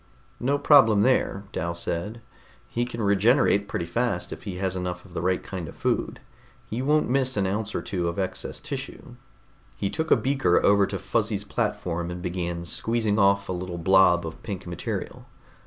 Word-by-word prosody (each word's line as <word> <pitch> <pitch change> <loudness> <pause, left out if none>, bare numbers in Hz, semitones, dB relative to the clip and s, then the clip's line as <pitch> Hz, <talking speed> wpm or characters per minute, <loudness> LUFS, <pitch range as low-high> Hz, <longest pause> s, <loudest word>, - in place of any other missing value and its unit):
"No 140 +4 +1
problem 115 -9 +6
there," 115 -5 +1
Dal 85 +1 -3
said. 90 +7 -3 0.5
"He 120 +1 -1
can 120 -2 -5
regenerate 100 +1 +3
pretty 85 - -3
fast 90 -1 -1
if - - -11
he 95 -3 -4
has 95 0 -1
enough 90 0 -4
of 90 - -15
the 90 - -3
right 90 +1 0
kind 90 -4 -6
of - - -12
food. - - -1 0.5
He 115 +3 -4
won't 150 +3 +2
miss 130 -1 +1
an 100 - +2
ounce 105 +2 -2
or - - -2
two 90 -3 -2
of 85 - -3
excess 95 -1 -2
tissue." - - -7 0.6
He 100 - -2
took 160 0 -2
a - - +7
beaker 130 -6 +2
over 100 -1 +5
to - - -3
Fuzzy's 105 -3 -1
platform 85 -3 -2
and 90 0 -5
began 85 -1 -3
squeezing 110 +3 0
off 100 0 +3
a - - -3
little 90 -1 -5
blob 90 0 +4
of 80 - -7
pink 100 -2 -6
material. 85 -2 -5
100 Hz, 185 wpm, -25 LUFS, 90-115 Hz, 0.6 s, a